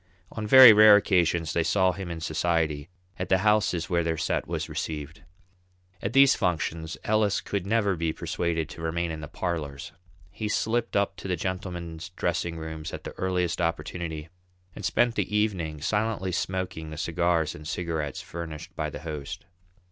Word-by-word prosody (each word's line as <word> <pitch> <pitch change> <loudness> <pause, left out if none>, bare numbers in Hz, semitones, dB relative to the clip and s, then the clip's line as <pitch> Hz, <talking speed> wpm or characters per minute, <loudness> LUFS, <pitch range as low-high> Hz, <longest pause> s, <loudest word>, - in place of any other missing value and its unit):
On 110 -1 -4
very 130 -1 +11
rare 105 0 +9
occasions 85 -5 +2
they 85 - +2
saw 95 +2 +3
him 95 -1 -6
in 85 -1 -5
society, 80 -1 0 0.3
at 90 0 -3
the 95 - +5
houses 95 -5 +2
where 85 0 +1
their 80 0 -1
"set" - - -1
was - - -3
received. 75 0 -5 0.8
At 100 - -3
these 135 0 +7
functions 85 -3 -2
Ellis 105 -2 +2
could 100 -2 -4
never 105 -3 +2
be 85 -1 -1
persuaded 80 -1 -2
to 80 - -9
remain 85 +1 -1
in 80 -1 -6
the 75 - -6
parlours; 75 -4 -4 0.4
he 105 +2 -4
slipped 115 +2 0
up 100 0 +1
to - - -7
the 90 - 0
gentlemen's 85 -2 -5
dressing 85 -1 -2
rooms 80 0 -6
at - - -6
the - - -6
earliest 90 -2 0
opportunity, 85 -1 -3 0.5
and 105 - -8
spent 120 +5 +2
the 105 - -2
evening 85 -8 -1
silently 105 0 -1
smoking 90 -3 -3
the 80 - -8
cigars 85 -1 0
and 75 0 -10
cigarettes 80 -4 -3
furnished 80 -2 -7
by 75 -1 -2
the - - -8
host. 80 +1 -6
85 Hz, 170 wpm, -27 LUFS, 80-95 Hz, 0.8 s, very